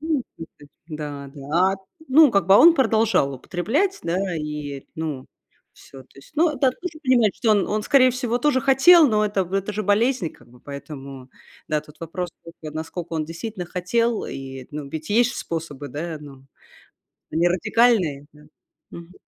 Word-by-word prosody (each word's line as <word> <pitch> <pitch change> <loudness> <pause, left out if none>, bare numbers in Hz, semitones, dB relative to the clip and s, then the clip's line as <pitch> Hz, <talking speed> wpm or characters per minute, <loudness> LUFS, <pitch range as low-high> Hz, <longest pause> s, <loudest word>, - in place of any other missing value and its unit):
Ну 310 -3 -1
слушай 150 -3 -12 0.2
Да-да. 145 -3 -7 0.4
А, - - -4 0.3
ну, 295 +2 +7
как 200 -5 +1
бы, 195 - +6
а - - +8
он 335 0 +8
продолжал 225 - +2
употреблять, 260 - -1
да, 180 +2 -1
и, 150 -2 -5
ну, 155 -5 -5 0.5
всё. 135 -1 -14
То 130 - -30
есть 135 - -16
ну, 330 +1 +4
да, 260 0 +3
тоже 330 +4 -8
понимать, 245 -7 +3
что 225 - +1
он 205 -2 +3
он, 210 +1 -1
скорее 255 +2 +5
всего, 245 -1 -2
тоже 260 0 +2
хотел, 280 +5 +6
но 215 -2 +2
это 205 -1 0
это 195 +1 -1
же 210 +1 -3
болезнь, 215 +1 +1
и - - -4
как - - -20
бы, 125 0 -19
поэтому, 140 -2 -9 0.4
да, 155 -1 0
тут 150 +1 -18
вопрос 175 +2 -5
всё-таки: 165 -2 -11
а - - -9
насколько 165 +2 -6
он 155 -1 -1
действительно 180 +3 -6
хотел? 220 +6 -1
И, 135 -1 -8
ну, 150 -1 -6
ведь 155 +5 -7
есть 240 +3 +3
ж - - -7
способы, 155 -4 -5
да, 155 +4 -5
ну, 135 -3 -13 0.9
не 170 +2 +2
радикальные, 180 - +2
да. 150 - -18 0.5
Мгм. 170 +1 -11
180 Hz, 180 wpm, -23 LUFS, 150-235 Hz, 0.9 s, а